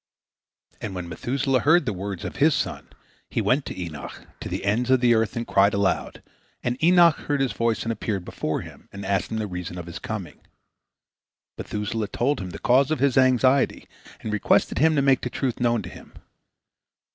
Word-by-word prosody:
And 100 Hz, -3 st, -5 dB
when 90 Hz, -1 st, -5 dB
Methuselah 130 Hz, -, 0 dB
heard 160 Hz, +5 st, +4 dB
the 110 Hz, -, -1 dB
words 95 Hz, -1 st, -5 dB
of -, -, -6 dB
his 150 Hz, +2 st, +4 dB
son, -, -, -3 dB, 0.4 s
he -, -, -2 dB
went 135 Hz, +2 st, +1 dB
to -, -, -6 dB
Enoch, 80 Hz, -5 st, -7 dB
to -, -, -6 dB
the -, -, -4 dB
ends 115 Hz, +5 st, +1 dB
of 130 Hz, -1 st, +5 dB
the 120 Hz, -1 st, +4 dB
earth, 110 Hz, -2 st, +1 dB
and 120 Hz, 0 st, -2 dB
he -, -, -12 dB
cried 100 Hz, +1 st, +4 dB
aloud, 100 Hz, -1 st, -1 dB, 0.4 s
and 125 Hz, +4 st, -2 dB
Enoch 175 Hz, -2 st, +6 dB
heard 145 Hz, -1 st, -2 dB
his 135 Hz, -2 st, +1 dB
voice, 115 Hz, -1 st, 0 dB
and 115 Hz, -, -2 dB
appeared 105 Hz, -5 st, -3 dB
before -, -, -3 dB
him, -, -, -13 dB
and 100 Hz, 0 st, -8 dB
asked 95 Hz, -1 st, 0 dB
him 110 Hz, -, -3 dB
the 110 Hz, -, -1 dB
reason 90 Hz, -2 st, -6 dB
of 90 Hz, -, -6 dB
his 85 Hz, -, -8 dB
coming. -, -, -6 dB, 1.2 s
Methuselah 105 Hz, +1 st, -3 dB
told 135 Hz, +7 st, 0 dB
him 95 Hz, -2 st, -5 dB
the -, -, -7 dB
cause 130 Hz, +3 st, +3 dB
of 155 Hz, -, 0 dB
his 135 Hz, -1 st, +2 dB
anxiety, 130 Hz, +1 st, +3 dB, 0.3 s
and 110 Hz, -, -4 dB
requested 105 Hz, -, +2 dB
him 160 Hz, +2 st, +4 dB
to 140 Hz, -, +2 dB
make 135 Hz, -2 st, +3 dB
the 125 Hz, -, -3 dB
truth 130 Hz, -1 st, -2 dB
known 120 Hz, -3 st, +1 dB
to 90 Hz, -, -7 dB
him. -, -, -14 dB
120 Hz, 205 wpm, -24 LUFS, 100-135 Hz, 1.2 s, Enoch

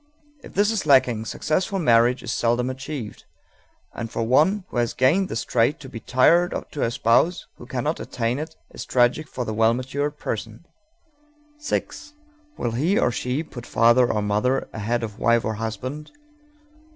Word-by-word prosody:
If -, -, -13 dB
this 205 Hz, +2 st, +3 dB
is 220 Hz, -8 st, -2 dB
lacking, 125 Hz, -5 st, +4 dB
successful 185 Hz, -, -1 dB
marriage 120 Hz, -5 st, +3 dB
is -, -, -3 dB
seldom 120 Hz, +2 st, +1 dB
achieved, 130 Hz, -4 st, -7 dB, 0.7 s
and 115 Hz, -1 st, -5 dB
for 115 Hz, -, -2 dB
one 155 Hz, -, +3 dB
who -, -, -6 dB
has 120 Hz, -1 st, 0 dB
gained 175 Hz, +10 st, +3 dB
this 115 Hz, -, -2 dB
trait 125 Hz, +7 st, +1 dB
to 145 Hz, -, -10 dB
be 115 Hz, -, -8 dB
tied 165 Hz, +10 st, +3 dB, 0.2 s
to 145 Hz, -, -5 dB
a -, -, +2 dB
spouse 120 Hz, +10 st, +2 dB
who 120 Hz, -, -12 dB
cannot 135 Hz, +5 st, -2 dB
attain 120 Hz, +2 st, -2 dB
it 160 Hz, +1 st, -6 dB, 0.2 s
is -, -, -7 dB
tragic 125 Hz, +5 st, +2 dB
for 125 Hz, -3 st, -5 dB
the 110 Hz, -, -3 dB
well 115 Hz, +1 st, +3 dB
matured 140 Hz, +4 st, -3 dB
person. 110 Hz, +5 st, -5 dB, 0.9 s
_6. 300 Hz, 0 st, -4 dB, 0.4 s
Will 120 Hz, -, -2 dB
he, 155 Hz, -, +1 dB
or 125 Hz, -, +2 dB
she, 125 Hz, +5 st, -2 dB
put 120 Hz, -6 st, -10 dB
father 120 Hz, +2 st, +4 dB
or 105 Hz, -1 st, -1 dB
mother 105 Hz, +6 st, 0 dB
ahead 115 Hz, +2 st, -2 dB
of 105 Hz, -2 st, -6 dB
wife 115 Hz, 0 st, +2 dB
or 110 Hz, -, -1 dB
husband? 115 Hz, +7 st, -5 dB
125 Hz, 170 wpm, -23 LUFS, 115-150 Hz, 0.9 s, lacking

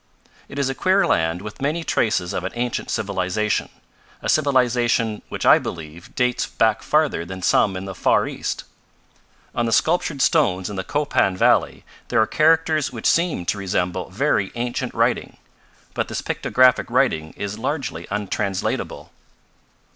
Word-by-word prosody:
"It 135 Hz, -, -9 dB
is 140 Hz, -2 st, +1 dB
a 135 Hz, -, -1 dB
queer 190 Hz, +7 st, +2 dB
land 80 Hz, +2 st, 0 dB
with 105 Hz, +3 st, -9 dB
many 155 Hz, +4 st, -1 dB
traces 105 Hz, -, 0 dB
of 90 Hz, -, -3 dB
an 95 Hz, -, -4 dB
ancient 120 Hz, 0 st, -2 dB
civilization, 100 Hz, 0 st, -1 dB, 0.5 s
a -, -, -2 dB
civilization 120 Hz, -6 st, +2 dB
which -, -, -4 dB
I -, -, +7 dB
believe 80 Hz, +1 st, -8 dB
dates 125 Hz, +1 st, 0 dB
back 110 Hz, -5 st, +1 dB
farther 150 Hz, -, +1 dB
than 95 Hz, +1 st, -8 dB
some 95 Hz, +1 st, +3 dB
in 95 Hz, -, -6 dB
the 95 Hz, -, -6 dB
far -, -, +2 dB
East. -, -, -4 dB, 0.9 s
On 120 Hz, -, 0 dB
the -, -, -1 dB
sculptured 155 Hz, +1 st, +1 dB
stones 90 Hz, +2 st, +2 dB
in -, -, -6 dB
the 95 Hz, -, -3 dB
Copan 140 Hz, -8 st, 0 dB
valley -, -, +2 dB, 0.2 s
there 115 Hz, -, +1 dB
are 110 Hz, -, +5 dB
characters 155 Hz, +1 st, +2 dB
which 115 Hz, -3 st, -8 dB
seem 170 Hz, -, +2 dB
to 100 Hz, -, -1 dB
resemble 90 Hz, -1 st, -2 dB
very 100 Hz, -2 st, 0 dB
ancient 120 Hz, 0 st, -3 dB
writing, -, -, 0 dB, 0.6 s
but -, -, -1 dB
this -, -, -4 dB
pictographic 130 Hz, -1 st, +2 dB
writing 80 Hz, 0 st, +1 dB
is 100 Hz, +1 st, -5 dB
largely 130 Hz, -, -3 dB
untranslatable. 100 Hz, -1 st, -3 dB
110 Hz, 155 wpm, -22 LUFS, 95-135 Hz, 0.9 s, I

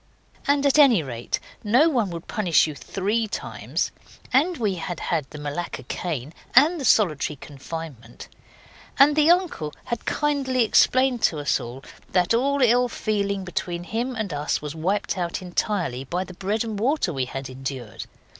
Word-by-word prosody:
And 285 Hz, 0 st, +3 dB
at 280 Hz, +2 st, +4 dB
any 245 Hz, -, +6 dB
rate 120 Hz, -3 st, -3 dB, 0.2 s
no 245 Hz, +9 st, +4 dB
one 240 Hz, -, +1 dB
would 170 Hz, -1 st, -7 dB
punish 185 Hz, -7 st, +3 dB
you 155 Hz, -, -4 dB
three 210 Hz, +9 st, -1 dB
times, -, -, -3 dB, 0.4 s
and 320 Hz, +7 st, +3 dB
we 210 Hz, -5 st, 0 dB
had 175 Hz, -1 st, -5 dB
had 155 Hz, -6 st, -2 dB
the 155 Hz, -, -9 dB
Malacca 145 Hz, -1 st, -4 dB
cane 150 Hz, 0 st, -4 dB, 0.2 s
and 305 Hz, +5 st, +6 dB
the -, -, -2 dB
solitary 160 Hz, -, +3 dB
confinement; 140 Hz, -4 st, -9 dB, 0.7 s
and 285 Hz, +2 st, +6 dB
the 305 Hz, +1 st, +4 dB
uncle 345 Hz, -, +2 dB
had 235 Hz, -3 st, -4 dB
kindly 275 Hz, -4 st, +1 dB
explained 255 Hz, +2 st, +3 dB
to 160 Hz, -, +2 dB
us 145 Hz, -1 st, 0 dB, 0.5 s
that 180 Hz, +2 st, +3 dB
all 275 Hz, +3 st, +2 dB
ill 245 Hz, +1 st, +4 dB
feeling 200 Hz, -3 st, -1 dB
between 175 Hz, -1 st, -3 dB
him 235 Hz, +7 st, -3 dB
and 215 Hz, -7 st, -3 dB
us 145 Hz, +1 st, -1 dB
was 150 Hz, -1 st, -6 dB
wiped 185 Hz, +4 st, -1 dB
out 170 Hz, -1 st, -2 dB
entirely 180 Hz, -, -2 dB
by 175 Hz, +7 st, -2 dB
the 185 Hz, -, -11 dB
bread 200 Hz, +5 st, -1 dB
and 220 Hz, -3 st, -4 dB
water 245 Hz, -, +1 dB
we 135 Hz, -2 st, -1 dB
had 135 Hz, +1 st, -6 dB
endured. 130 Hz, -4 st, -6 dB
195 Hz, 165 wpm, -24 LUFS, 155-250 Hz, 0.7 s, any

